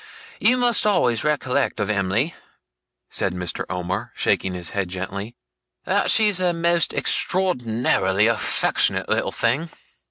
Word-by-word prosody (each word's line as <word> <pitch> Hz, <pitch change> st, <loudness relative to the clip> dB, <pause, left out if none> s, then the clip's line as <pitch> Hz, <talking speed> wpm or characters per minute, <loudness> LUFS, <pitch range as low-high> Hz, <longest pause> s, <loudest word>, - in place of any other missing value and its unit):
You 245 Hz, +4 st, +3 dB
must 245 Hz, -2 st, +2 dB
always 120 Hz, -, +2 dB
recollect 140 Hz, -4 st, 0 dB
of 105 Hz, 0 st, 0 dB
Em'ly,' 100 Hz, -, 0 dB, 0.8 s
said 90 Hz, -, -2 dB
Mr. 90 Hz, -2 st, -4 dB
Omer, 90 Hz, +1 st, -4 dB
shaking 95 Hz, -1 st, 0 dB
his 90 Hz, -2 st, -4 dB
head 100 Hz, -3 st, -2 dB
gently, 100 Hz, +5 st, -5 dB, 0.5 s
'that -, -, +1 dB
she's 210 Hz, -4 st, +3 dB
a 180 Hz, -1 st, +1 dB
most 170 Hz, 0 st, +1 dB
extraordinary 115 Hz, -, +1 dB
affectionate 115 Hz, 0 st, +1 dB
little -, -, 0 dB
thing. 135 Hz, +9 st, 0 dB
115 Hz, 125 wpm, -22 LUFS, -, 0.8 s, You